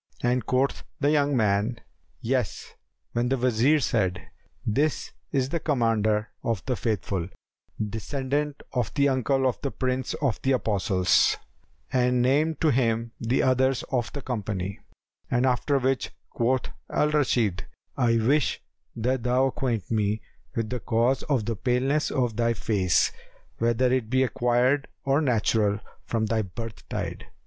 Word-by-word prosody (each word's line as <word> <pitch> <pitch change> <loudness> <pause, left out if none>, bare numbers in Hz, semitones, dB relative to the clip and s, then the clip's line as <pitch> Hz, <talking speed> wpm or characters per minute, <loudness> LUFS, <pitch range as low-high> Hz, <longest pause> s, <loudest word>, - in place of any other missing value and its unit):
and 120 -1 +1
quoth 130 +2 +1 0.2
the 145 +1 +3
young 145 -2 +2
man 110 +2 +1 0.4
"Yes;" 125 -3 -2 0.4
when 120 +1 0
the 135 - +1
Wazir 125 +4 +3
said, 95 -9 0 0.5
"This 140 +8 0 0.2
is 135 -2 +1
the 170 - -1
Commander 115 -7 +1
of 115 -6 -2
the 130 - 0
Faithful, 100 -6 -2 0.5
descendant 135 +7 -2
of 125 -5 0
the 140 -1 +4
uncle 130 0 +1
of 120 -5 -2
the 140 - -1
Prince 130 -1 -2
of 135 -6 -1
the 135 - +2
Apostles," 100 -5 +2 0.6
and 125 -1 +3
named 150 +5 +2
to 155 - +4
him 115 -2 +1
the 120 +2 +1
others 130 0 +2
of 120 -3 0
the 140 - -6
company; 100 -5 -3 0.5
after 125 +3 +2
which 130 0 0 0.2
quoth 125 +1 0 0.2
Al 150 - +1
Rashid, 120 - +1 0.3
"I 120 -3 +3
wish 135 +6 +2 0.4
that 125 +3 0
thou 125 +2 +2
acquaint 120 -7 -2
me 105 -1 0 0.3
with 115 -1 -2
the 125 - -2
cause 120 +4 +1
of 130 -7 +1
the 115 - -1
paleness 130 +6 +1
of 120 -5 -1
thy 115 0 +2
face, 95 -4 +2 0.5
whether 120 +2 +2
it 125 -4 0
be 130 +1 +3
acquired 125 +2 +2 0.2
or 140 +2 +3
natural 110 -6 +2 0.3
from 115 -1 0
thy 110 +1 +1
birth 110 +3 -8
tide." - - -4
125 Hz, 145 wpm, -26 LUFS, 110-135 Hz, 0.6 s, the